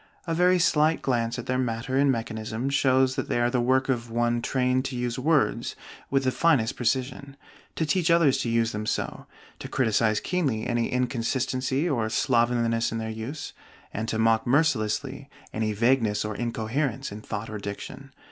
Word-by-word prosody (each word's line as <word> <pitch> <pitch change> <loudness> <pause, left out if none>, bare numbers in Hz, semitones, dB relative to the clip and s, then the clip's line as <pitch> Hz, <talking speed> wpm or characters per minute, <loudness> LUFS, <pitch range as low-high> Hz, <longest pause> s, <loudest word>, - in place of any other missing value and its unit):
A 165 - -2
very 180 +2 +4
slight 160 -2 +2
glance 120 -3 0
at 125 - -6
their 130 0 -1
matter 125 +1 -2
and 140 0 +4
mechanism 115 +1 -3
shows 130 -1 +3
that - - -3
they - - +1
are 120 0 +2
the 125 -1 +1
work 130 +2 +2
of 120 -3 -1
one 120 +1 0
trained 130 +1 +1
to 130 - -4
use 120 0 -2
words 150 +2 +1 0.3
with 135 0 +1
the 130 - +2
finest 135 -8 +2
precision, 135 +3 -2 0.4
to 160 - 0
teach 170 +2 +1
others 170 -5 +4
to 120 - -1
use 115 0 +1
them 105 0 -4
so, - - -3 0.3
to - - -6
criticize 110 -3 +1
keenly 135 - -1
any 120 -1 -1
inconsistency 130 +3 -1
or 115 -8 0
slovenliness 115 -2 +1
in 115 - -3
their 110 0 -3
use, 115 +7 -6 0.4
and 110 +2 -3
to 110 - -1
mock 115 0 +2
mercilessly 135 0 0 0.2
any 110 0 -1
vagueness 110 -1 +1
or 105 -1 -4
incoherence 120 +3 -2
in 105 +1 -8
thought 105 0 -5
or 105 - -5
diction. 100 +7 -7
125 Hz, 175 wpm, -26 LUFS, 115-135 Hz, 0.4 s, very